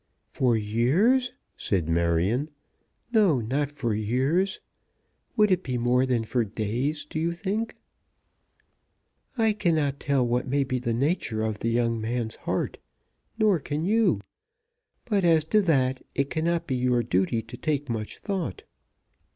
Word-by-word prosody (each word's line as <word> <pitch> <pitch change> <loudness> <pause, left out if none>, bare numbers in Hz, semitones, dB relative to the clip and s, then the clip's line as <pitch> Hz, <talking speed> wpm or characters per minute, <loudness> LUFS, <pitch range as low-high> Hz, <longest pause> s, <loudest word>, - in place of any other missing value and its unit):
"For 120 -3 +2
years?" 155 - +2 0.2
said 90 -6 -1
Marion. 85 - +1 0.6
"No, 200 - +4
not 135 +6 -1
for 125 -6 -2
years. 130 - 0 0.8
Would 210 -2 +4
it 185 -1 +3
be 125 -7 -3
more 125 +2 +2
than 120 -3 0
for 120 +2 0
days, 115 +8 -2
do 155 - -4
you 170 +2 0
think?" 205 +6 -3 1.6
"I 225 -2 +3
cannot 160 -9 0
tell 140 -3 +1
what 120 +2 0
may 140 +2 +1
be 130 -1 -2
the 120 -2 -1
nature 120 -5 0
of 110 -2 -2
the 115 - -1
young 115 -1 +1
man's 115 0 -2
heart; - - -3 0.6
nor 210 -6 +3
can 150 +3 -3
you. 220 +3 +2 0.8
But 205 -5 +1
as 165 -3 +4
to 215 - +6
that, 130 -8 +1
it 140 0 0
cannot 170 +1 0
be 130 - -1
your 125 -1 +2
duty 105 +2 0
to 115 +3 -10
take 145 +1 -2
much 110 -2 -4
thought. 200 - -4
130 Hz, 145 wpm, -26 LUFS, 115-170 Hz, 1.6 s, to